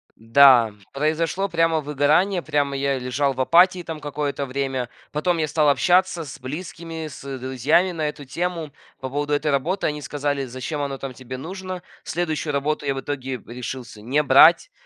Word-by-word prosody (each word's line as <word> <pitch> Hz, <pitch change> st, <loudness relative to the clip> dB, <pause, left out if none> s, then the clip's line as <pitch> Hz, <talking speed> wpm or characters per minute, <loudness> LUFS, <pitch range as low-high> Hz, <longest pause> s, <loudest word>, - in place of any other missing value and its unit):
Да, 115 Hz, -1 st, +6 dB, 0.2 s
произошло 160 Hz, +6 st, 0 dB
прямо 165 Hz, -2 st, +2 dB
выгорание, 150 Hz, +6 st, +2 dB
прямо 145 Hz, -3 st, 0 dB
я 135 Hz, 0 st, 0 dB
лежал 135 Hz, +2 st, 0 dB
в 130 Hz, -, -2 dB
апатии 175 Hz, +5 st, +4 dB
там 160 Hz, -2 st, -6 dB
какое-то 145 Hz, -1 st, -3 dB
время, 130 Hz, -2 st, -2 dB, 0.2 s
потом 170 Hz, +4 st, 0 dB
я 155 Hz, -1 st, 0 dB
стал 150 Hz, 0 st, +2 dB
общаться 175 Hz, +3 st, +3 dB
с 145 Hz, 0 st, -9 dB
близкими, 160 Hz, +3 st, -6 dB
с 140 Hz, -2 st, -7 dB
друзьями 130 Hz, +8 st, +1 dB
на 160 Hz, -3 st, -2 dB
эту 145 Hz, -1 st, -9 dB
тему. 165 Hz, +2 st, -3 dB, 0.3 s
По 130 Hz, -, -5 dB
поводу 145 Hz, +2 st, -2 dB
этой 150 Hz, +1 st, +1 dB
работы 160 Hz, +8 st, 0 dB
они 150 Hz, 0 st, -1 dB
сказали: 145 Hz, 0 st, -2 dB
"Зачем 130 Hz, +4 st, -5 dB
оно 140 Hz, -1 st, -3 dB
там 135 Hz, -1 st, -6 dB
тебе 130 Hz, 0 st, -8 dB
нужно?" 185 Hz, +4 st, -6 dB, 0.2 s
Следующую 155 Hz, -3 st, -2 dB
работу 145 Hz, +1 st, -1 dB
я 135 Hz, -, 0 dB
в -, -, -3 dB
итоге 135 Hz, -2 st, -4 dB
решился 120 Hz, -2 st, -7 dB
не 135 Hz, +7 st, +1 dB
брать, 155 Hz, -, +6 dB
145 Hz, 170 wpm, -23 LUFS, 135-165 Hz, 0.3 s, Да